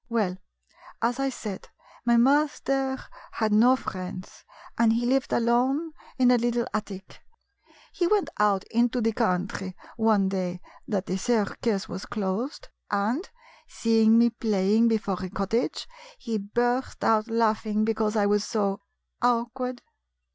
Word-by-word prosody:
Well, 210 -6 0 0.7
as 240 +3 +1
I 275 0 +1
said, 210 -6 -7 0.4
my 235 0 +4
master 270 0 +2 0.4
had 220 -2 0
no 240 +5 +6
friends, 185 -5 -7 0.3
and 230 -1 +4
he 235 +1 0
lived 265 +2 +1
alone 255 +7 +1 0.3
in 250 -1 +5
a 245 - +4
little 240 0 0
attic. 200 -3 -6 0.7
He 350 - +1
went 415 0 +1
out 205 -2 +3
into 240 +2 +2
the 225 -1 +1
country, 190 -3 -1 0.2
one 220 -4 +3
day 180 -2 -3 0.3
that 195 -4 -1
the 185 - -2
circus 215 -1 0
was 190 - -7
closed, 215 - -3 0.2
and, 215 - -1 0.4
seeing 225 -1 +3
me 235 0 +5
play 210 -3 +1
ing 230 +1 +5
before 205 -5 -1
a 185 - -4
cottage, 200 +6 -2 0.4
lie 225 -2 -1
burst 240 +5 -1
out 220 0 +3
laughing 220 -1 +1
be 225 - +1
cause 220 0 -1
I 210 -2 +3
was 205 0 +2
so 205 -3 -1
— - - -53
" - - -51
"Awkward 245 +1 -1
225 Hz, 145 wpm, -26 LUFS, 205-245 Hz, 0.7 s, no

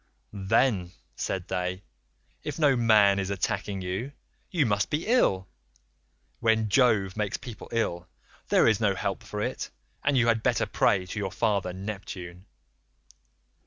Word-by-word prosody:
"'Then,' 100 -2 +1 0.2
said 95 -1 -3
they, 90 +1 -2 0.6
'if - - -4
no 145 -4 +4
man 105 -4 +5
is 95 -1 -2
attacking 100 0 -2
you, 95 +10 -4 0.4
you 165 -6 +2
must 100 -3 +1
be 150 +3 -1
ill; 95 - +2 0.9
when 110 -2 +2
Jove 105 -6 +3
makes 105 -2 -1
people 125 -4 -10
ill, 90 -6 -1 0.4
there - - +5
is - - +3
no - - +2
help - - -2
for - - -4
it, - - -3 0.3
and 145 -2 +2
you 120 - +4
had 115 -1 +2
better - - +1
pray 95 -2 +2
to 100 +4 -5
your 100 -2 -2
father 100 -5 0
Neptune. 95 -1 -7
100 Hz, 145 wpm, -27 LUFS, 95-115 Hz, 0.9 s, man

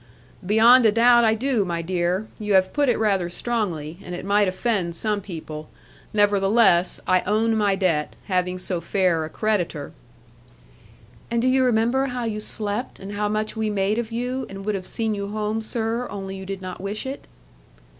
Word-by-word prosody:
'Beyond 225 +6 +6
a - - +4
doubt 240 +2 +5
I 220 -1 +4
do, 245 -2 0
my 170 -2 -3
dear. 180 +3 -1
You 210 -1 -1
have 185 0 +3
put 290 -2 +2
it 240 - +2
rather 195 -5 +1
strongly; 175 -7 -3
and 180 - -6
it 175 - -7
might 205 0 +3
offend 185 -3 -1
some 210 +3 0
people. 155 -5 -8 0.4
Nevertheless 200 -2 +3
I 185 0 +3
own 220 +2 +2
my 205 -2 +2
debt, 170 -6 0
having 180 -2 0
so 180 -1 -2
fair 175 -2 +1
a - - -7
creditor.' 175 -8 -2 1.4
'And 235 0 0
do 245 - +1
you 260 0 +3
remember 245 +3 +2
how 250 -1 -4
you 220 -2 -2
slept, 215 +2 -2
and 195 +1 -8
how 205 0 -1
much 215 +1 -2
we 220 -1 -1
made 205 +2 0
of 235 -1 -4
you, 250 +3 -3
and 195 0 -8
would 210 - 0
have 185 -2 -4
seen 225 -1 -1
you 200 -1 -4
home, 215 +1 -2
sir; 225 +2 -1
only 195 -1 -6
you 190 0 -8
did 195 -1 -5
not 185 0 -7
wish 200 +4 -4
it?' 270 +1 -6
205 Hz, 185 wpm, -23 LUFS, 185-225 Hz, 1.4 s, Beyond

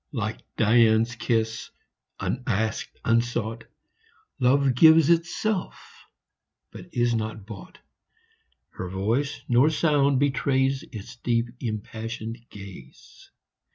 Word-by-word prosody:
Like 110 -4 -3 0.2
Dian's 115 +1 +4
kiss, 115 -2 -1 0.5
unasked, 110 -3 -2
unsought, 115 -1 0 0.7
Love 135 +1 +3
gives 160 +4 +6
itself, 175 +4 0 0.9
but - - -11
is 120 -1 +1
not 110 -2 -3
bought; 110 - -11 1.0
15 - - -21
Nor 90 - -4
voice, 115 +10 -1
nor 125 +5 +4
sound 145 -4 +2
betrays 135 -1 +1
Its 115 +3 -9
deep, 120 0 0
impassioned 115 +1 -5
ga/e. 95 -10 -11
120 Hz, 95 wpm, -25 LUFS, 110-135 Hz, 1.0 s, gives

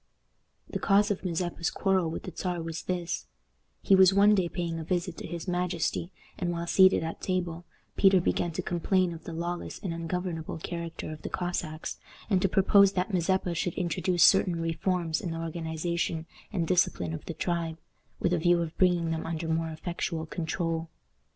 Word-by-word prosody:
The - - -4
cause 205 +1 +3
of 195 - -2
Mazeppa's 175 -1 -1
quarrel 190 -4 +1
with 160 - -5
the 185 - -7
Czar 180 -1 -2
was 165 0 -4
this: 175 -1 -2 0.6
He - - +4
was 190 0 +7
one 205 +1 +6
day 185 -4 +2
paying 170 -2 -3
a - - -4
visit 175 +1 -1
to - - -6
his 170 +2 -6
majesty, 175 -1 -1 0.3
and, 180 -3 -1
while 170 0 -3
seated 185 0 +5
at 165 - -5
table, 175 -2 -2 0.3
Peter 195 -1 +6
began 175 0 0
to - - -3
complain 180 +1 +1
of 165 - -11
the - - -5
lawless 170 +2 -4
and 180 -4 -4
ungovernable 165 -1 -3
character 165 -1 -5
of 155 -1 -8
the - - -5
Cossacks, 175 -3 -3 0.3
and 185 -2 +4
to 195 - +2
propose 200 +1 +5
that 185 +2 -1
Mazeppa 180 0 +1
should 170 +1 -2
introduce 180 0 +1
certain 180 -3 +5
reforms 165 0 -1
in 180 - -3
the 165 - -4
organization 165 0 -2 0.3
and 170 -3 -1
discipline 90 - +1
of 80 - -6
the 170 - -5
tribe, 165 -1 -2 0.4
with 175 - +1
a 175 - +2
view 175 +1 +4
of 160 -1 -6
bringing 175 -3 +3
them 160 0 -3
under 165 0 -3
more 160 0 0
effectual 160 0 -3
control. 165 0 -2
170 Hz, 185 wpm, -29 LUFS, 165-185 Hz, 0.6 s, was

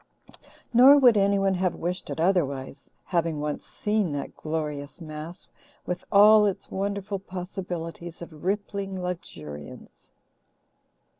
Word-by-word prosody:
Nor 260 +4 +9
would 250 -5 +6
anyone 195 -1 +3
have 185 -1 0
wished 180 +2 -3
it - - -4
otherwise, 140 -6 0 0.2
having 165 -4 0
once 150 0 -4
seen 210 -6 -1
that 140 - -5
glorious 150 -2 -4
mass, 160 +2 -8 0.4
with 180 0 -3
all 210 +1 +7
its 195 - -4
wonderful 200 0 -2
possibilities 175 -3 -6
of 160 -3 -11
rippling 195 0 -2
luxuriance. 75 - -8
180 Hz, 115 wpm, -26 LUFS, 155-200 Hz, 0.4 s, Nor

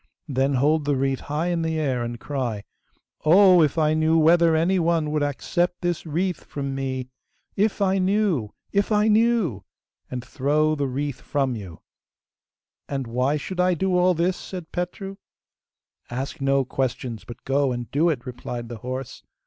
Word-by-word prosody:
Then 135 0 +1
hold 150 +3 +2
the 145 -1 +2
wreath 135 0 0
high 155 +4 -2
in 170 -1 0
the 160 -1 -1
air 130 -5 0
and 120 0 -5
cry, 120 -8 -3 0.6
"Oh! 180 +2 +7
if 150 0 +2
I 155 -1 +3
knew 160 +1 +3
whether 165 +1 +5
any 175 +4 +2
one 165 -2 +1
would 150 -1 0
accept 175 +5 -1
this 175 -2 -2
wreath 175 +3 -1
from 140 -1 -4
me... 130 -2 -3 0.5
if 205 0 +1
I 190 0 +2
knew! 185 - +1 0.2
if 200 +2 +1
I 210 0 +3
knew!" 220 - +2 0.5
and 125 -1 -5
throw 150 +4 +1
the 145 -2 -1
wreath 135 0 -3
from 135 -4 -1
you!' 95 -7 -9 1.1
'And 135 -2 -2
why 125 +5 0
should 180 +5 -6
I 180 0 +3
do 185 +2 0
all 180 0 +4
this?' 175 +3 +1
said 180 -4 -8
Petru. 195 +2 -4 0.9
'Ask 135 +5 -5
no 135 0 +2
questions, 125 -3 -3
but 120 - -11
go 135 0 +2
and 120 -2 -5
do 160 +5 +3
it,' 135 -6 -2
replied 120 -2 -6
the 120 - -6
horse. 130 +3 -6
150 Hz, 170 wpm, -24 LUFS, 130-175 Hz, 1.1 s, Oh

